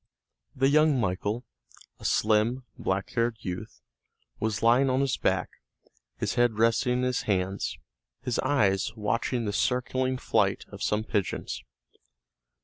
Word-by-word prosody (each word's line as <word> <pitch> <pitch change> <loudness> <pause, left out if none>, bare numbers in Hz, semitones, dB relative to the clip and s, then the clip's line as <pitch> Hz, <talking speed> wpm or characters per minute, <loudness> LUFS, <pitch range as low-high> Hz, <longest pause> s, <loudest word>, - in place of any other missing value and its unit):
The 135 +1 +3
young 150 -2 +4
Michael, 105 +3 -1 0.5
a - - -11
slim, 110 +4 +2
black 95 +1 -2
haired 115 -1 0
youth, 90 -1 -6 0.6
was 110 0 -1
lying 125 +4 +5
on 130 +1 +2
his 140 -2 +1
back, - - 0 0.7
his - - -1
head 120 -3 +2
resting 115 +2 +3
in 125 0 0
his 125 0 0
hands, 95 0 -1 0.5
his 125 -1 -1
eyes 110 -6 +1
watching 115 +2 -1
the 100 - -2
circling 130 +2 0
flight - - +1
of - - -10
some 105 +1 +1
pigeons. 100 - -2
115 Hz, 135 wpm, -28 LUFS, 105-130 Hz, 0.7 s, lying